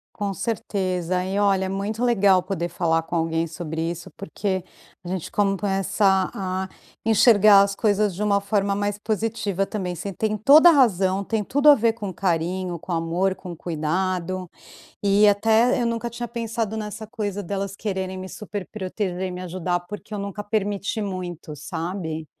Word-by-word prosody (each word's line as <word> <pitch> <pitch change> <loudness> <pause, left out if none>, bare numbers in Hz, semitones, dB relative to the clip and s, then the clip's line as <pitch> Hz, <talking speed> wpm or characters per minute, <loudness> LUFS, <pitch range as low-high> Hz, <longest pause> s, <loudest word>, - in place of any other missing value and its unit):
Com 200 -2 -2
certeza, 185 -4 -2
e 190 +2 -2
olha, 195 -2 +2
muito 205 +4 -2
legal 200 -6 +4
poder 185 -3 -2
falar 165 -1 +1
com 165 - -5
alguém 165 0 0
sobre 160 0 -5
isso, 170 0 -7
porque 190 +3 -2 0.4
a - - -7
gente 185 -2 -4
começa 195 -1 +1
a 190 -1 -3 0.4
enxergar 215 -2 +7
as 200 0 +1
coisas 210 -2 +1
de 185 - -6
uma 200 -1 +2
forma 200 -1 0
mais 205 0 -1
positiva 215 -3 -1
também. 185 -4 -4
Você 200 +3 -5
tem 215 +3 -1
toda 295 - +8
a - - +6
razão, 195 - +3
tem 215 +1 -1
tudo 285 +6 +4
a 290 - +10
ver 230 -1 +2
com 205 -5 -6
carinho, 175 0 -1
com 180 - -9
amor, 170 +3 0
com 180 -2 -8
cuidado, 180 +3 -2 0.5
e 200 +1 +5
até 225 +4 +3
eu - - +1
nunca 230 0 -2
tinha 240 +1 -6
pensado 225 -2 -3
nessa 215 0 -5
coisa 205 -3 -4
delas 195 +1 -3
quererem 190 -3 -3
me 185 0 -6
superproteger 195 -2 -5
e 185 - -2
me 180 0 -6
ajudar, 180 0 -2
porque 210 +4 -9
eu - - -3
nunca 200 +1 -5
permiti 205 0 -1
muito, 180 -5 -5
sabe. 160 0 -4
195 Hz, 165 wpm, -23 LUFS, 180-210 Hz, 0.5 s, a